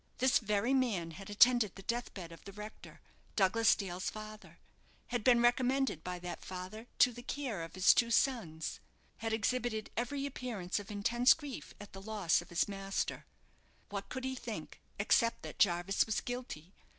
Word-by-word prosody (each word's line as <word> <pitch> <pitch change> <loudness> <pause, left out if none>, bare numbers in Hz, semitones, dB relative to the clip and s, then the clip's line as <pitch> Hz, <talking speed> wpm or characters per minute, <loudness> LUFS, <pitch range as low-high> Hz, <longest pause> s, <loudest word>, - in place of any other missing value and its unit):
This 260 +1 +4
very 215 +3 +1
man 215 -11 +1
had 195 +5 -9
attended 225 0 +5
the 195 - -10
deathbed 210 -7 -4
of 165 - -12
the 200 - -9
rector 210 +2 -10 0.3
Douglas 225 +3 +4
Dale's 185 -2 -3
father 215 0 -10 0.5
had 240 -3 -1
been 240 0 +5
recommended 250 - +2
by 180 0 -4
that 175 0 -7
father 190 +5 -7
to 250 - +6
the 245 - -9
care 245 -7 -3
of 165 +2 -7
his 185 0 +7
two 235 - +3
sons, 225 - 0 0.4
had 225 0 -3
exhibited 220 0 -1
every 275 +4 -1
appearance 230 -9 -3
of 205 - -9
intense 235 +5 +4
grief 290 -5 -8
at 205 0 -11
the 195 - -8
loss 200 -5 +1
of - - -14
his 175 - +1
master. 195 -1 -3 0.6
What 200 -1 -5
could 260 - -5
he 260 0 -1
think, 230 -10 -7 0.2
except 230 +3 +2
that - - -8
Jarvis 175 +1 +3
was 220 - 0
guilty? 245 -9 -6
215 Hz, 170 wpm, -34 LUFS, 190-245 Hz, 0.6 s, his